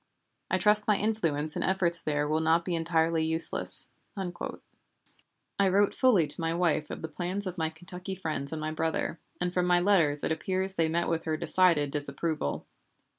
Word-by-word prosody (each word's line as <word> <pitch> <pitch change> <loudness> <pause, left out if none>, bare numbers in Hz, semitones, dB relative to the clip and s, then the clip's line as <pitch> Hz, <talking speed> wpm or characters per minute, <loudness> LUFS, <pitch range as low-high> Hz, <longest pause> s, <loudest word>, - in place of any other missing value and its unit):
I 185 - +1
trust 210 +2 +5
my 210 -2 +3
influence 165 -9 -1
and - - -2
efforts 175 -3 +3
there 150 -1 -1
will 155 +1 0
not 165 +1 +1
be 180 - -2
entirely 165 -1 +1
useless." 160 +1 +2 0.3
I 190 +1 -7
wrote 200 +2 +2
fully 235 - +3
to 160 - -3
my 165 0 -1
wife 170 -3 0
of - - -7
the - - -3
plans 180 +5 -2
of 185 -1 -5
my 160 0 0
Kentucky 180 +4 -8
friends 155 -6 -4
and 160 - -4
my 155 0 -4
brother, 160 +1 -2 0.2
and 180 0 -2
from 180 -1 0
my 175 0 +3
letters 170 -6 +3
it - - -1
appears 190 +3 +2
they 165 -3 0
met 170 +2 -1
with 165 -1 -2
her 155 -1 -1
decided 165 -6 +2
disapproval. 145 - -3
170 Hz, 180 wpm, -28 LUFS, 160-185 Hz, 0.3 s, trust